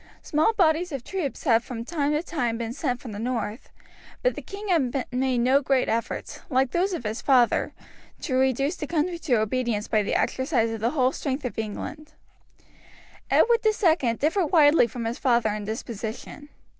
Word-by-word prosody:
Small 310 +8 +2
bodies 350 -3 +2
of 275 -4 -4
troops 350 -6 -4
had 230 -5 +3
from 230 -2 -6
time 295 -1 -1
to 300 +2 0
time 245 -10 -2
been 230 0 -4
sent 255 -3 -2
from 240 - -9
the 205 - -6
north; 230 -1 -3 0.5
but - - +3
the - - -7
king 405 +1 -8
had 270 -7 +1
made 255 0 0
no 260 +4 +3
great 270 -2 +1
efforts, 230 +1 -3
like 260 -2 +2
those 370 +3 +1
of 335 - -4
his 215 +2 -3
father, 250 -4 +3 0.5
to 275 - -3
reduce 265 +4 +1
the 300 - -5
country 340 +2 -1
to 280 -7 +1
obedience 220 -1 -1
by 215 - +2
the 200 - -1
exercise 260 -4 +1
of 225 - -4
the 230 - +2
whole 255 -1 +3
strength 275 -1 -3
of 245 - -4
England. 300 +8 -6 1.2
Edward 470 0 +4
II 345 - +2
differed 325 - +1
widely 295 -6 +6
from 235 0 -6
his 230 +2 -3
father 235 -5 +2
in 210 0 -4
disposition. 225 +6 -6
260 Hz, 180 wpm, -25 LUFS, 235-310 Hz, 1.2 s, widely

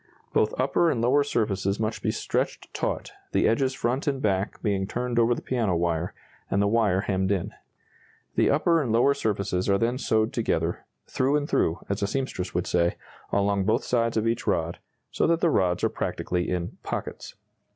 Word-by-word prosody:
Both 110 - +1
upper 140 +6 +3
and 125 - 0
lower 130 +5 +3
surfaces 100 -7 0
must 110 0 -2
be - - 0
stretched - - -2
taut, - - -2 0.2
the - - +3
edges 130 +4 +1
front 125 +5 -1
and 135 -2 +1
back 100 -3 0
being 100 -3 0
turned 120 +1 -1
over 120 +1 +4
the - - -7
piano 115 -8 0
wire, 85 0 -1 0.3
and 100 - +1
the 100 - +3
wire 105 -4 +2
hemmed 95 -1 0
in. 95 -4 -1 0.8
The - - +3
upper 165 +3 +3
and 125 -6 -1
lower 120 +5 +4
surfaces 100 -5 -1
are 100 - +4
then 120 +4 0
sewed 110 +1 +1
together 85 -7 -1 0.2
"through 135 +3 +1
and 145 -1 0
through," 80 - +1
as 100 0 -2
a 100 - +1
seamstress 105 -7 -3
would 90 - 0
say 85 0 +1 0.4
along 100 -1 +1
both 110 +3 +2
sides 115 -2 +1
of 110 - +1
each 115 0 -1
rod, 85 +1 0 0.3
so - - +1
that 165 0 +3
the 170 -2 +3
rods 90 - +1
are - - +3
practically 90 -1 -2
in 90 -1 -3
"pockets." - - -5
110 Hz, 190 wpm, -26 LUFS, 95-125 Hz, 0.8 s, over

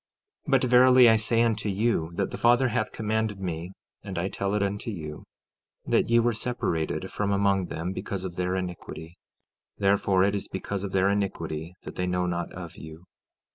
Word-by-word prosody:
15:19 - - -3
But, 135 -1 +4
verily, 125 0 +7
I 110 - +6
say 115 +1 +2
unto 110 -2 0
you 100 -5 0
that 100 0 -1
the - - -5
Father 120 +2 +4
hath 125 +2 -1
commanded 110 -1 -1
me, 85 -1 -4 0.3
and 95 -3 -7
I 90 +3 -1
tell 100 +1 -2
it 105 - +1
unto 100 +3 -3
you, 75 -7 -7 0.6
that - - +2
ye 115 - +5
were 120 0 +3
separated 95 -6 -2
from 100 -1 -1
among 100 -2 +2
them 90 +3 -4
because 95 -1 -4
of 90 -2 -6
their 90 +1 -1
iniquity; 90 -2 -6 0.6
therefore 100 -1 +3
it 100 +1 +2
is 100 - -3
because 95 +1 -4
of 100 - -4
their 95 0 +3
iniquity 85 -4 -2
that - - -9
they 90 - -1
know 90 0 0
not 85 -1 -2
of 85 -2 -8
you. 80 +1 -10
100 Hz, 190 wpm, -27 LUFS, 90-110 Hz, 0.6 s, verily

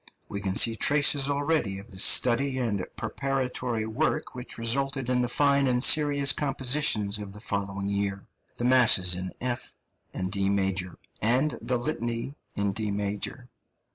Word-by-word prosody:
We 100 - -6
can 95 -1 -2
see 115 +2 +4
traces 145 +2 +3
already 145 -8 -1
of 100 +4 -11
the 95 - -8
study 130 +5 +4
and 110 -7 -2
preparatory 125 -1 -3
work 155 +7 -2
which 125 0 -8
resulted 135 +3 -1
in 125 0 +2
the 125 - -1
fine 140 +1 +2
and 125 0 +1
serious 145 -2 +4
compositions 130 -7 0
of 100 -1 -8
the 105 - -9
following 100 -1 -3
year 100 -1 -3 0.3
the 120 - -2
Masses 115 -8 +5
in 90 +1 -4
F 125 -1 -3 0.4
and 95 0 -4
D 100 -1 0
major, 95 -2 -1 0.2
and 125 +7 +3
the 125 - -1
Litany 120 -1 -3 0.2
in 100 -1 0
D 105 +1 -3
major. 105 +5 -4
120 Hz, 155 wpm, -26 LUFS, 100-135 Hz, 0.4 s, Masses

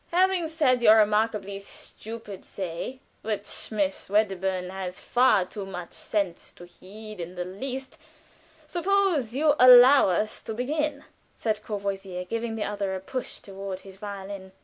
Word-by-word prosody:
"Having 360 -1 +2
said 275 -6 +2
your 220 -2 +8
remarkably 210 -2 +1
stupid 210 0 -9
say, 190 +8 -6 0.2
which 210 -1 -4
Miss 200 -4 -2
Wedderburn 190 -3 0
has 185 -1 -5
far 245 -7 +3
too 205 +1 -7
much 180 -3 -7
sense 195 -5 -3
to 175 - -13
heed 205 +4 -11
in 175 +1 -6
the 180 0 -3
least, 260 +8 -6 0.7
suppose 355 - +1
you 300 +1 +4
allow 255 0 +9
us 210 +4 -1
to 220 - -6
begin," 290 +4 -2 0.3
said 215 -2 -1
Courvoisier, 195 -3 -4
giving 230 +3 -3
the 220 - -2
other 200 -2 -2
a - - -3
push 255 +6 -6
toward 195 -1 -7
his 195 -1 -13
violin. 195 -2 -7
210 Hz, 145 wpm, -26 LUFS, 190-250 Hz, 0.7 s, allow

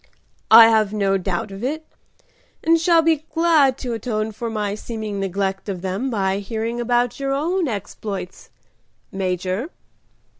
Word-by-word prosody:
"I 225 +1 +10
have 215 -2 +2
no 195 -2 +1
doubt 185 +2 -3
of 195 +3 -8
it, 310 +5 -3 0.8
and 330 0 +4
shall 335 -1 +4
be 320 -2 +2
glad 315 -6 +4
to 245 -3 -4
atone 220 -1 -2
for 230 +2 -5
my 210 -2 -2
seeming 215 -1 -5
neglect 195 +1 -2
of 185 -2 -5
them 195 +8 -2
by 195 -4 0
hearing 225 +3 -3
about 240 +1 0
your 275 0 -1
own 335 +5 0
exploits. 200 -3 -6 0.6
Major." 185 - -2
220 Hz, 145 wpm, -21 LUFS, 195-270 Hz, 0.8 s, I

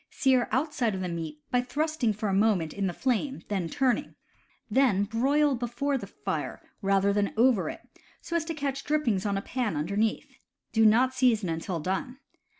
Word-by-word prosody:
Sear 260 -2 +2
outside 260 -6 0
of 185 - -4
meat 165 -4 -4
by 250 - +3
thrusting 290 -1 0
for 215 +1 -3
a 195 - 0
moment 195 -6 +2
in 200 -1 -1
the - - -1
flame, 260 - -1
and 180 -5 -1
turning; 260 -2 0 0.5
then 245 -8 +3
broil 275 +7 +2
before 245 +3 -1
the 265 - -4
fire, - - -4 0.2
rather 195 0 +2
than 205 0 0
over 235 -4 +3
it, - - -7 0.4
so 340 - -5
as 335 - +2
to 330 -1 -4
catch 275 -2 -3
drippings 240 -11 0
on 200 -1 0
a 195 - -3
pan 245 -8 -2
under 160 +7 -2
neath. 220 +1 -1 0.3
Do 220 -1 +5
not 250 +4 +4
season 230 -8 +2
until 165 +2 -3
done. 190 - -3
225 Hz, 180 wpm, -28 LUFS, 195-265 Hz, 0.5 s, Do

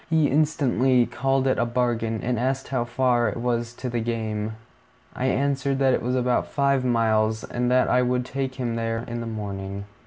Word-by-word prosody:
He 160 -2 +3
instantly 135 -4 +3
called 135 +1 0
it 130 - +2
a 120 - +2
bargain, 120 -2 -1
and 120 -1 0
asked 130 +2 -1
how 125 -3 0
far 120 -2 +2
it 105 - -5
was 120 -1 -1
to 125 - -6
the 120 -1 -1
game. 110 -2 -2 0.6
I 125 - -2
answered 135 0 0
that 135 -1 +3
it - - +1
was 125 +2 -1
about 125 -1 +1
five 140 -2 +1
miles, 110 -3 +1
and 120 0 -2
that 125 0 +3
I 125 - +3
would 125 0 0
take 130 0 -3
him 120 -3 -2
there 115 0 -2
in 120 0 -4
the 115 - -5
morning. 100 -2 -5
125 Hz, 195 wpm, -24 LUFS, 115-130 Hz, 0.6 s, He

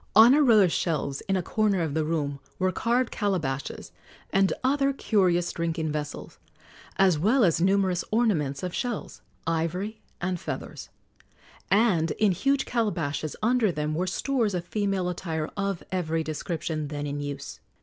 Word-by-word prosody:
On 225 +4 +9
a 300 - +5
row 230 -7 +6
of 180 -3 +4
shelves 150 -6 -1
in 195 - +3
a 185 - 0
corner 210 0 +1
of 160 -4 -1
the 160 +1 +1
room 150 -3 -2 0.2
were 185 0 +1
carved 235 +5 0
calabashes 160 - -2 0.4
and 195 0 +4
other 275 +1 +2
curious 180 -8 +2
drinking 165 -2 -2
vessels, 150 -1 -5 0.6
as 185 -5 +4
well 225 - +3
as 165 -3 +3
numerous 190 -1 +2
ornaments 175 - +1
of 180 -1 -3
shells, 245 -4 -4 0.2
ivory 170 +6 -2 0.2
and 180 0 -2
feathers; - - -6 0.8
and 190 -5 +3
in 210 -2 +3
huge 275 +10 +1
calabashes 165 -10 -1
under 230 -3 +3
them 150 -1 -2
were 180 +4 -1
stores 225 +1 0
of 175 -1 -3
female 195 -2 -1
attire 165 -3 -3
of 200 -3 -2
every 165 -3 -1
description 155 0 -3
then 145 0 -4
in 145 0 -3
use. 145 -1 -6
180 Hz, 155 wpm, -26 LUFS, 160-210 Hz, 0.8 s, On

